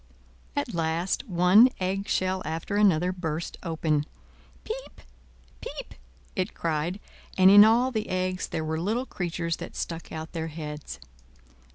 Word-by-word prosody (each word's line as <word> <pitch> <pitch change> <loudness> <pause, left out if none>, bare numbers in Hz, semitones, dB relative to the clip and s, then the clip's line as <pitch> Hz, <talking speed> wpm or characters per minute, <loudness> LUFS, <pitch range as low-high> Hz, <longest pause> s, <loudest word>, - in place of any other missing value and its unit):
At 285 -6 -2
last 170 +8 -1
one 185 +7 +6
egg 195 +2 -1
shell 185 0 0
after 160 +5 -3
another 185 -4 +4
burst 165 -3 -4
open. 160 -3 0 0.6
"Piep! - - -7 0.6
piep!" - - -7 0.4
it 185 -1 -2
cried, 165 +4 -1 0.4
and 190 0 +7
in 205 +1 +10
all 235 +4 +4
the 220 -3 -3
eggs 185 0 -1
there 160 - -3
were 160 +1 -2
little 225 +8 0
creatures 170 -6 -3
that - - -8
stuck 165 -1 -5
out 160 0 -6
their 165 -1 -3
heads. 150 -2 -7
180 Hz, 140 wpm, -27 LUFS, 160-195 Hz, 0.6 s, in